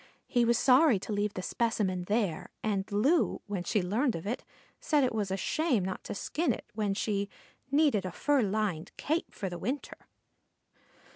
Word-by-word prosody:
He 240 -1 +2
was 235 0 +3
sorry 265 -1 +5
to 205 +3 -5
leave 205 0 -1
the 185 - -4
specimen 195 -6 0
there, 205 -5 0
and 200 -2 -1
Loo, 270 +12 +2
when 200 -4 -3
she 205 +1 +1
learned 230 +8 +1
of 165 - -6
it, 230 +5 -3 0.4
said 295 -2 +2
it 250 - +1
was 210 -3 -1
a 190 - -1
shame 255 - +1
not 190 - -4
to - - -4
skin 320 - 0
it - - -5
when 210 -2 -1
she 200 -1 -1 0.4
"needed 280 -7 +3
a 185 - -4
fur 285 - +2
lined 200 -5 -1
cape 320 +3 -1
for 195 - -4
the 175 -1 -5
winter." 270 +10 -4
210 Hz, 185 wpm, -30 LUFS, 195-255 Hz, 0.4 s, sorry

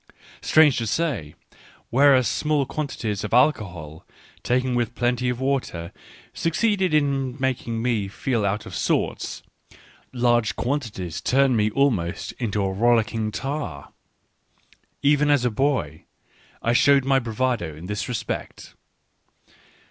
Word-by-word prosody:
Strange 155 -4 +5
to 115 - -2
say, 125 - -2 0.6
whereas 130 0 +5
small 150 -2 0
quan 150 +2 -3
tities 105 -6 -4
of 105 - -1
alcohol, 90 - 0 0.4
taken 125 +1 0
with 120 -2 -1
plenty 125 0 0
of 125 -1 -2
water, 130 -11 -2 0.4
suc 165 - -2
ceed 205 +1 +1
in 140 -6 +1
making 120 -3 -2
me 115 -5 0
feel 115 +3 -2
out 100 +1 -1
of - - -9
sorts, - - -1 0.7
large 120 -3 +1
quanti 130 -1 -1
ties 90 -5 -6
turn 135 -1 +3
me 105 -1 +2
almost 105 -9 0
into 105 -4 -1
a 95 - 0
rollicking 115 0 +1
tar. 135 - -5 1.1
Even 145 +1 +3
as 145 -4 +3
a 125 - +1
boy 110 - -1 0.6
I 115 - +2
showed 140 +1 +4
my 135 0 +3
bravado 115 - -2
in 80 +3 -10
this 105 +5 -4
respect. 120 -3 -5
125 Hz, 135 wpm, -23 LUFS, 105-140 Hz, 1.1 s, Strange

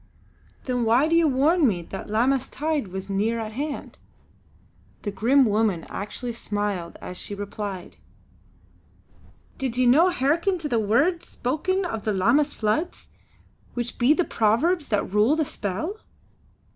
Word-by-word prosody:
"Then 250 -2 -1
why 235 +6 +4
did 330 - +2
you 335 -1 +5
warn 295 +4 +3
me 180 -6 -1
that 195 +4 -8
Lammas 255 +4 +1
tide 300 -5 -2
was 190 +1 -6
near 210 +4 0
at 220 -1 -4
hand?" 285 +6 -5 1.0
The 205 - -2
grim 250 +7 +4
woman 210 -6 +1
actually 225 +4 -5
smiled 205 -6 -3
as 180 - -6
she 205 - -4
replied: 200 -2 -6 1.6
"Did 260 -3 -2
ye 255 - +3
no 305 +9 +6
hearken 335 +5 +1
to 320 -3 -4
the 235 -5 +1
words 280 - +1
spoken 365 +9 -1
of 225 - -4
the 215 - 0
Lammas 245 +10 +2
floods, 225 +12 -2 0.7
which 240 -1 -4
be 245 +5 +5
of - - -5
the 355 - +2
Powers 280 +10 +1
that 200 -3 -1
rule 215 +8 +4
the 315 -1 +1
Spell?" 225 - -4
240 Hz, 150 wpm, -24 LUFS, 210-300 Hz, 1.6 s, no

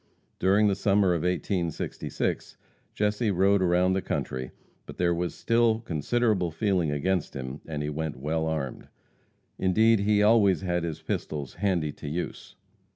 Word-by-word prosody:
During 100 +3 +4
the 100 - +3
summer 100 0 +2
of 85 - -1
1866 90 -1 -2 0.4
Jesse 105 +2 0
rode 100 +1 +3
around 90 +1 +3
the 95 - 0
country, 65 -6 -3 0.4
but - - -10
there 85 -1 +2
was 85 +1 -2
still 115 -1 +2
considerable 100 +1 0
feeling 90 -1 0
against 80 +4 -1
him, 65 +1 -6
and 75 -2 -3
he 75 - -2
went 80 -2 -4
well 80 +4 -1
armed. 75 -5 -4 0.7
Indeed, 110 +4 +4
he 105 +1 +3
always 105 -4 +4
had 90 -2 -1
his 80 -3 -5
pistols 70 -4 -4
"handy 90 -7 0
to 75 - -10
use." 85 +4 -5
90 Hz, 150 wpm, -27 LUFS, 80-100 Hz, 0.7 s, During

